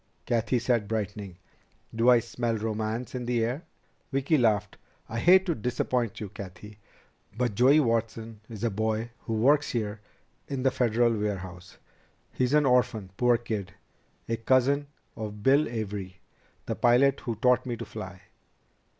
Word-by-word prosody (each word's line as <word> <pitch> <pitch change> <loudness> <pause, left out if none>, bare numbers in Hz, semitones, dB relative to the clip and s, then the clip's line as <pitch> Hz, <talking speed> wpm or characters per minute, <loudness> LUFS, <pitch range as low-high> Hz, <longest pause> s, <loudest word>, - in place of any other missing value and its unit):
Cathy 115 +1 +1
said, 120 -3 0
brightening. 100 -4 -4 0.6
"Do 115 +2 +4
I 125 - +8
smell 120 0 -2
romance 110 +2 -3
in 125 -1 -4
the 120 -2 +1
air?" 130 +8 -4 0.5
Vicki 135 +3 +1
laughed. 105 -6 +1 0.3
"I 115 - -4
hate 185 +7 +6
to 175 - +1
disappoint 120 -1 -1
you, 105 - -5
Cathy. 100 +2 -10 0.6
But 120 -3 0
Joey 130 +8 +5
Watson 115 -3 -1
is 110 -2 -8
a 115 - +1
boy 110 +3 -1
who 115 - -2
works 140 +7 +3
here 105 -3 -3 0.5
in 135 -2 -3
the 130 - +3
Federal 120 -1 +2
warehouse. 90 -4 -5 0.5
He's 130 +3 +1
an 150 -1 +4
orphan, 125 -6 +1
poor 120 +1 +3
kid, 105 -7 -5 0.5
a 115 - -1
cousin 130 +5 +2 0.3
of 105 -1 -6
Bill 140 +3 +4
Avery, 100 -5 -5 0.5
the - - -2
pilot 130 +3 +3
who 120 -3 -4
taught 125 +2 +2
me 120 -2 -3
to 115 - -6
fly." 95 -4 -8
115 Hz, 150 wpm, -27 LUFS, 105-125 Hz, 0.6 s, I